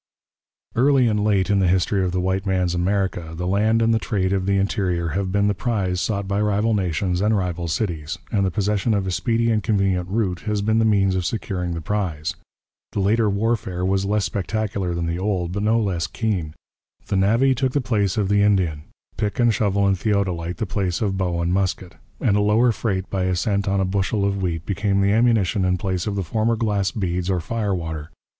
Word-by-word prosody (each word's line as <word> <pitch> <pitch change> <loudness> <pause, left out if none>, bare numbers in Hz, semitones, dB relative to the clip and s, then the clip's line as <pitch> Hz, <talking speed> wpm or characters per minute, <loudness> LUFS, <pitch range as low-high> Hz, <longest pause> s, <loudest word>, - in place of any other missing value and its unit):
Early 130 +1 +4
and 105 -2 +1
late 100 -2 +2
in 100 - +3
the 95 - +3
history 95 +2 +2
of 90 - 0
the 90 - -1
white 95 +1 0
man's 90 -2 +1
America 90 -2 -1
the 90 - -3
land 110 +4 +2
and 115 0 +3
the 110 - +2
trade 95 -3 -1
of 95 -1 -1
the 100 0 +2
interior 95 -4 0
have 95 +3 -2
been 100 +1 +2
the 105 - +2
prize 95 -5 -1
sought 100 -3 -2
by 100 +1 0
rival 105 +2 +1
nations 90 -1 0
and 105 +1 +2
rival 90 -2 -2
cities, 85 -1 -2
and 100 -2 +1
the 95 - +2
possession 105 +3 0
of 100 -2 -1
a 95 - -2
speedy 115 +4 +1
and 110 -1 +1
convenient 95 -5 0
route 95 -4 -1
has 105 -1 0
been 110 +1 +2
the 110 - +3
means 100 -3 +3
of 90 - 0
securing 90 -3 -3
the 85 - -4
prize. 85 -5 -2 0.6
The - - -1
later 105 +3 +2
warfare 100 -3 -1
was 95 0 +1
less 105 0 0
spectacular 100 -3 -2
than 85 0 -2
the 85 +1 -2
old, 95 -3 -1
but 100 +2 -3
no 110 +2 +2
less 95 -6 -1
keen. 95 -9 -2 0.5
The - - -2
navvy 115 +8 +3
took 130 0 -1
the 145 - +2
place 110 -7 0
of 105 -3 +1
the 100 +1 +3
Indian, 90 -7 +1 0.3
pick 105 +4 -2
and 120 -2 +4
shovel 100 -1 +1
and 100 -1 +3
theodolite 90 -4 -1
the 110 - -2
place 95 -3 -2
of 100 -2 0
bow 90 -3 -1
and 85 +1 0
musket, 95 -1 -1 0.3
and 100 - +2
a 105 - +3
lower 110 +4 +3
freight 100 -3 -2
by 95 -2 0
a 95 0 +1
cent 100 +2 0
on 100 0 +1
a 95 - +1
bushel 100 +2 0
of 100 -1 -1
wheat 85 -3 -2
became 100 0 0
the 100 0 +3
ammunition 110 -3 +2
in 90 0 +1
place 95 -2 -2
of 105 - -2
the 100 - -1
former 110 +6 0
glass 105 -4 0
beads 90 -3 -2
or 95 -2 +1
fire 105 +2 -2
water. 80 -3 -5
100 Hz, 220 wpm, -22 LUFS, 90-105 Hz, 0.6 s, Early